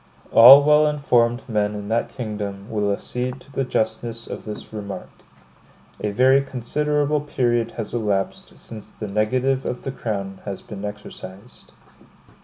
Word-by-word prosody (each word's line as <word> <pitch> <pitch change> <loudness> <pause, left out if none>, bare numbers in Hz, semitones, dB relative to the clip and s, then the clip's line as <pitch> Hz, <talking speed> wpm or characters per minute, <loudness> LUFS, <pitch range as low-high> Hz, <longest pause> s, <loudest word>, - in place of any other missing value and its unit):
All 135 +5 +10
well 150 +1 +5
informed 125 -5 +1
men 105 -2 0
in 105 -1 -6
that 115 +1 0
kingdom 105 -4 -5
will 105 -2 0
accede 125 +5 -3
to 140 - -18
the 135 - -1
justness 115 -1 -2
of - - -8
this 105 0 -8
remark. 100 -2 -7 0.9
A 105 - -2
very 130 +6 +4
considerable 150 +3 -1
period 120 -5 0
has 110 -1 -5
elapsed 105 -5 -2
since 110 -2 -10
the 105 - -7
negative 130 +6 0
of 125 - -4
the 135 - -3
crown 100 -6 -5
has 100 -2 -6
been 100 -2 -8
exercised. 105 +1 -10
115 Hz, 145 wpm, -22 LUFS, 105-130 Hz, 0.9 s, All